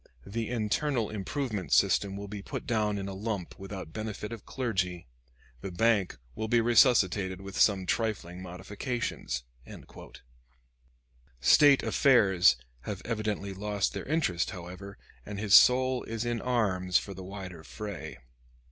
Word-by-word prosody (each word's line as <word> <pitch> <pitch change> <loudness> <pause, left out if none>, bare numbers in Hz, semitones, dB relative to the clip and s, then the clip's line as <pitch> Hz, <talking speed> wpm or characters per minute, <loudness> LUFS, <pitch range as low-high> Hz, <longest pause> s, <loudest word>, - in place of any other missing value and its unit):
The 115 +2 -4
Internal 120 +1 0
Improvement 105 - -3
System 100 -1 +3
will 100 0 -6
be 105 0 -6
put - - -6
down 105 -3 0
in 100 0 -4
a 100 - -5
lump 100 -3 -4
without 95 -4 -8
benefit 105 -1 -5
of 115 - -10
clergy. 95 -9 -2 0.6
The 95 - -5
Bank 105 0 +1 0.2
will 110 - -4
be 120 +1 +3
resuscitated 105 -6 +3
with 95 0 -9
some 95 -3 +4
trifling 90 -5 -2
modifications." 95 - -4 2.0
State 140 - +6
affairs 95 - +4 0.2
have 95 +9 -6
evidently 105 -3 -2
lost 100 0 -1
their - - -5
interest, 140 - 0
however, 95 +3 -9 0.3
and 105 -1 -7
his 105 -2 0
soul 130 0 +6
is 115 +1 -4
in 120 -1 -1
arms 95 -7 +1
for 100 - -4
the 95 0 -9
wider 95 -3 -8
fray. 105 +1 -7
100 Hz, 135 wpm, -29 LUFS, 95-115 Hz, 2.0 s, State